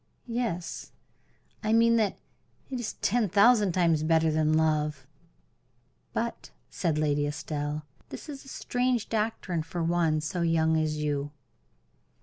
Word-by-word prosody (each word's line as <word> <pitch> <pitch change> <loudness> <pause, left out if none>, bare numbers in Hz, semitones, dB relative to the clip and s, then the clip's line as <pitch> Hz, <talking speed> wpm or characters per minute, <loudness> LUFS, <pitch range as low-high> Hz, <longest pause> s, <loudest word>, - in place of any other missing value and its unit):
"Yes, 230 -8 -3 0.7
I 215 0 +1
mean 230 +1 +5
that 215 -3 +1 0.5
it 255 - -2
is 235 - -3
ten 225 -1 +2
thousand 205 0 +5
times 165 -4 +3
better 160 0 +3
than 155 0 +2
love." 150 -3 0 1.1
"But," - - -3 0.2
said 160 -3 -1
Lady 145 -1 +1
Estelle, 150 0 -4 0.2
"that - - -8
is 280 -3 -8
a - - -17
strange 250 -3 -1
doctrine 210 -6 -1
for 170 +2 -4
one 165 -2 +2
so 155 +4 -3
young 160 -1 +2
as 155 -1 0
you." 145 -1 -1
165 Hz, 130 wpm, -28 LUFS, 155-220 Hz, 1.1 s, mean